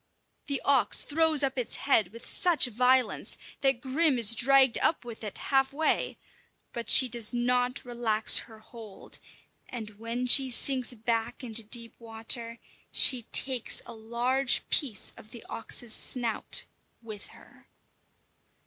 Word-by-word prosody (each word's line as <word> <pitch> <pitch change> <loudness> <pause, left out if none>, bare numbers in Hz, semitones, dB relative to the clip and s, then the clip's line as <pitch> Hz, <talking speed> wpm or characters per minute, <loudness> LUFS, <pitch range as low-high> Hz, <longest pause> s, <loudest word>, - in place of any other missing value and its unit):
The 280 -1 -1
ox 275 -3 +3
throws 315 -1 +1
up 265 -1 -1
its 245 - -3
head 225 -8 +1
with 230 +6 -14
such 350 -6 +1
violence 250 0 0 0.2
that 270 -3 0
Grim 275 +2 +1
is 230 -2 +5
dragged 265 +2 +4
up 315 - 0
with 230 -1 -10
it 210 - -6
halfway; 275 +3 -1 0.6
but 235 -1 -6
she 260 - +6
does 235 0 -2
not 250 +1 -1
relax 235 -3 +3
her 220 - -14
hold, 220 -2 -9 0.5
and 225 -3 -7
when 230 +2 -4
she 265 +1 +6
sinks 255 0 -1
back 225 +2 -3
into 230 -2 -1
deep 230 +1 -5
water, 230 +1 -3 0.3
she 245 -4 +4
takes 260 -3 0
a 235 - -10
large 240 +4 -1
piece 235 -9 -1
of 215 - -15
the 235 - -12
ox's 230 0 0
snout 235 -2 0 0.4
with 215 -3 -10
her. - - -20
240 Hz, 140 wpm, -28 LUFS, 225-265 Hz, 0.6 s, she